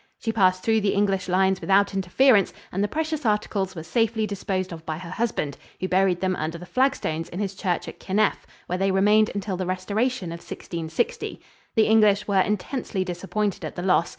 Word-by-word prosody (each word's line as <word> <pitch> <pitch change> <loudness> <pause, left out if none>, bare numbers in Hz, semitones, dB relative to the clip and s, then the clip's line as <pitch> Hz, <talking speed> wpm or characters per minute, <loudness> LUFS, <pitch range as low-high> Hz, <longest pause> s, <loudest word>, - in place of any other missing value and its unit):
She 225 - -2
passed 185 -4 +3
through 220 -1 +3
the 205 - +1
English 195 -2 +1
lines 190 +1 +2
without 200 +1 +3
interference, 195 +3 +4 0.2
and 195 +3 0
the - - +2
precious 310 +4 -2
articles 210 -3 0
were 160 - -6
safely 220 +5 +1
disposed 190 -3 -3
of 160 -1 -9
by 155 -1 -4
her 170 0 -8
husband, 185 - -2 0.2
who 185 - -1
buried 185 -1 +2
them 185 -1 +1
under 160 +2 -3
the 175 - -10
flagstones 175 - 0
in 175 - -7
his 200 -1 -2
church 180 -3 -2
at 165 - -9
Kinneff, 210 +2 0 0.2
where 180 +1 -3
they 195 0 +2
remained 210 +3 +4
until 195 -2 -2
the 185 -1 -3
restoration 200 +2 -1
of 170 - -6
1660. 165 +6 -4 0.4
The 220 - +5
English 210 -2 +4
were 195 -2 +3
intensely 205 0 -2
disappointed 195 +3 -2
at - - -5
the 175 - -4
loss. 180 -3 +3
195 Hz, 195 wpm, -25 LUFS, 180-215 Hz, 0.4 s, The